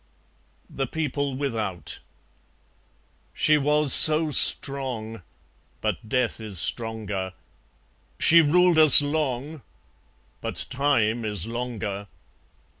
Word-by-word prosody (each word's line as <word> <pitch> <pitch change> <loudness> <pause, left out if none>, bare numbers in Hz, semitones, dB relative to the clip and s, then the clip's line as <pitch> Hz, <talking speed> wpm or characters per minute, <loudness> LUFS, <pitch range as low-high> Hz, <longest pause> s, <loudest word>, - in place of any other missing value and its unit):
(The 135 -1 -6
People 145 -2 -5
without) 110 - -6 1.4
She 150 -1 +1
was 150 0 +2
so 155 0 +7
strong; 125 -7 +2 0.6
But 110 - -6
death 125 -2 -3
is 105 -4 -9
stronger. 105 -1 -4 0.8
She 170 +1 +3
ruled 175 +2 +1
us 155 -2 +7
long; 145 0 -5 0.8
But - - -5
Time 120 -5 -2
is 105 -2 -3
longer. 115 -4 -7
130 Hz, 90 wpm, -22 LUFS, 110-150 Hz, 1.4 s, so